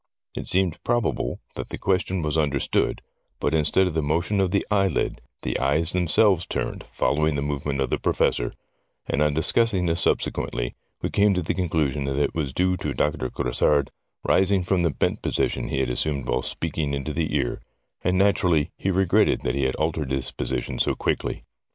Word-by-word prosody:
It - - -4
seemed 90 -3 +1
probable 120 -2 -1
that - - -6
the - - -5
question 95 -1 0
was 75 0 -1
understood, 70 -4 0 0.4
but 75 - 0
instead 80 +4 +3
of 90 - -2
the 80 - +1
motion 85 +7 0
of 95 -1 +2
the 100 +2 0
eyelid, 100 -2 +1 0.2
the - - -1
eyes 75 +5 +1
themselves 90 +1 +3
turned, - - -3
following 75 +1 0
the 70 - -1
movements 70 -1 -1
of - - -4
the - - 0
Professor, - - +1 0.5
and 70 - -1
on 75 -1 +2
discussing 95 +3 +2
this 85 0 +1
subsequently - - 0 0.3
we - - -1
came 100 -1 +3
to 90 - 0
the - - -1
conclusion 75 -6 0
that 70 0 -2
it 75 - +1
was 75 -5 -2
due 90 +5 +1
to - - -3
Doctor 70 -4 0
Grassard 70 +4 +1 0.3
rising 95 0 +3
from 90 0 +1
the 85 - +2
bent 70 - -1
position - - -1
he 65 - -1
had 65 - 0
assumed 70 +1 -1
while - - +1
speaking 75 -3 -2
into 70 +2 -4
the 80 -1 -1
ear, - - -1 0.4
and 90 +1 +2
naturally 90 -5 +3
he 95 - -1
regretted 95 +3 +3
that 60 - -1
he 70 -1 0
had 65 - 0
altered 80 -2 -1
his 65 -1 -2
position 65 -1 -3
so - - +2
quickly. - - -2
80 Hz, 190 wpm, -24 LUFS, 70-90 Hz, 0.5 s, instead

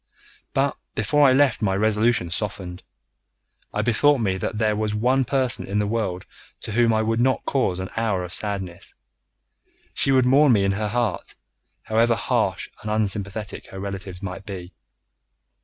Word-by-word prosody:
But 135 0 +1 0.2
before 145 +7 +3
I - - +4
left 135 -1 +3
my 95 -3 +1
resolution 110 -2 +1
softened. 90 -1 -4 0.9
I 105 - -1
bethought 130 +5 +3
me 100 -5 0
that 105 +3 -3
there 110 -1 +1
was 105 0 -1
one 125 +4 +2
person 130 -1 0
in 100 - -2
the 105 - +1
world 100 -4 -2 0.4
to - - -6
whom 115 +1 +3
I 110 0 +2
would 115 +1 0
not 130 +2 +1
cause 125 -10 0
an 95 0 -5
hour 110 -5 0
of 90 0 -5
sadness. 95 -4 -2 1.0
She 135 - +1
would 130 -2 +4
mourn 135 +1 +5
me 100 -3 +3
in 100 - +2
her 105 +2 -1
heart, 115 -3 -2 0.5
however 115 +1 +2
harsh - - 0
and 105 - -5
unsympathetic 105 -1 -2
her 95 - -9
relatives 95 -1 -6
might 95 0 -6
be. 95 -3 -8
105 Hz, 165 wpm, -23 LUFS, 95-120 Hz, 1.0 s, mourn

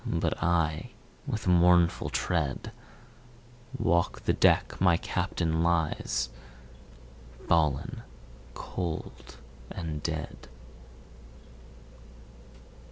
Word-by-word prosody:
But - - -1
I, 80 -2 +1 0.4
with 110 - -3
mournful 90 -1 +4
tread, 80 -6 -1 1.1
Walk 85 +1 +1
the - - +1
deck - - +3
my 90 -2 +5
Captain 80 -1 -1
lies, 80 -7 0 1.2
Fallen 80 -4 +1 0.5
cold 85 -4 -5 0.3
and 80 -3 -5
dead. 80 0 -5
85 Hz, 70 wpm, -29 LUFS, 80-85 Hz, 1.2 s, my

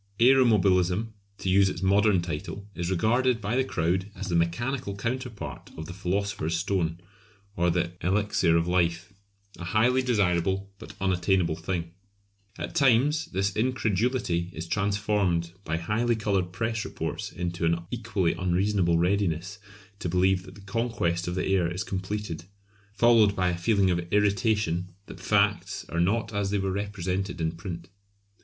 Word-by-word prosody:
Aeromobilism 110 -6 +4 0.3
to - - -6
use 95 +1 +5
its 90 0 -5
most 95 - +3
modern 100 -3 +4
title 90 +4 -5
is 85 -2 -3
regarded 115 +6 +2
by 105 +2 -2
the 130 - +3
crowd 95 -3 -1
as 95 0 -5
the 85 - 0
mechanical 100 +7 -1
counterpart 115 - -5
of 80 - -5
the 90 - -7
Philosopher's 95 -3 -1
Stone 85 -3 -1 0.6
or 90 0 +2
the 85 0 0
Elixir 95 -3 +2
of 85 +1 0
Life; 90 +1 0 0.5
a - - -6
highly 115 +8 +3
desirable 95 -5 +1
but - - -11
unattainable 95 -2 +1
thing. 85 0 -4 0.7
At - - -5
times 145 +1 +3
this 95 +1 -1
incredulity 110 -6 0
is 80 - -5
transformed 100 -3 0
by 80 -2 -2
highly 110 +8 0
coloured 100 -4 0
press 110 +3 -2
reports - - -4
into 85 -1 -4
an 85 +1 +1
equally 105 -7 0
unreasonable 90 -1 +1
readiness 90 +1 0 0.4
to 90 - -3
believe 90 +1 +2
that 90 - -12
the 100 - -13
conquest 100 -5 -1
of 90 - -2
the 95 - -1
air 90 -3 +1
is 90 +2 -3
completed, 95 -3 -4 0.5
followed 110 -1 +4
by 90 -2 +1
a 90 - -1
feeling 95 +2 +2
of 85 -1 -2
irritation 100 -3 +1
that - - -11
facts - - +1
are 85 - -2
not 110 +5 0
as 100 -1 0
they 105 - 0
were 95 -1 -1
represented 95 -2 -3
in 80 -1 0
print. 85 0 -7
95 Hz, 155 wpm, -27 LUFS, 85-105 Hz, 0.7 s, use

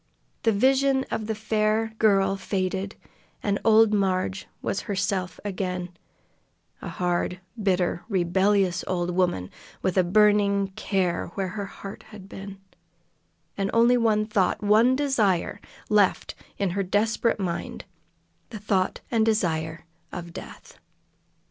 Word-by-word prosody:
The 225 - +3
vision 265 +4 +3
of 215 - -2
the 220 - -1
fair 220 +1 0
girl 195 -3 +3
faded, 190 0 -2 0.5
and 200 -1 0
old 220 -1 +5
Marg 190 -1 0 0.2
was - - -2
herself 190 -2 -1
again, 185 -2 -3 0.9
a - - -6
hard, 180 0 -1 0.2
bitter, 180 -3 +1
rebellious 190 0 +2
old 180 -1 -1
woman, 175 - 0 0.3
with 185 0 +1
a - - +5
burning 200 +1 +3
care 190 -2 -1
where 195 -2 -2
her 200 +1 -5
heart 195 +1 -9
had 205 -3 -11
been, 195 0 -9 1.0
and 195 -1 -1
only 235 +2 +5
one 220 -3 +2
thought, 210 -2 0
one 220 +5 +5
desire, 215 -9 +1 0.3
left 205 -3 +2 0.2
in 195 -3 0
her 200 +3 -1
desperate 215 +4 +1
mind 175 -3 -4 0.6
the 225 - -7
thought 195 -2 0
and 230 -2 +2
the - - +6
desire 165 -6 -1 0.3
of 170 -1 -7
death. - - -11
200 Hz, 130 wpm, -25 LUFS, 185-215 Hz, 1.0 s, the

